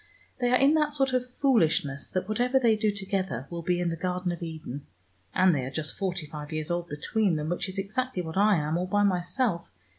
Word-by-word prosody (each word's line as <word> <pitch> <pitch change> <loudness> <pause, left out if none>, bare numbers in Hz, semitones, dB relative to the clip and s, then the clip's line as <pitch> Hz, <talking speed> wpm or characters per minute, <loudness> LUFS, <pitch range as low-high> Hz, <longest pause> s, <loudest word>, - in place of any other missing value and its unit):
They 245 -1 +2
are 250 - +5
in 275 +3 +5
that 300 -2 +2
sort 270 -2 +1
of 250 0 0
foolishness, 160 - +2
that 185 - -2
whatever 245 +5 +2
they 235 -4 +4
do 215 0 +1
together 190 - -3
will 170 0 -4
be 175 +1 0
in 175 -1 0
the 165 - -2
Garden 180 +1 -2
of 175 - -6
Eden. 155 -4 -6 0.5
And 185 -1 +5
they 135 -4 0
are 130 - -3
just 155 +2 -3
forty 185 -4 -2
five 150 0 -8
years 155 +1 -3
old 175 0 -2
between 185 +6 0
them 155 0 -2
which 175 +2 -1
is 190 - -7
exactly 195 +1 -2
what 160 -1 -6
I 205 +1 +5
am 155 +1 0
all 180 - -2
by 205 +2 +2
myself. 180 0 0
180 Hz, 230 wpm, -28 LUFS, 160-215 Hz, 0.5 s, are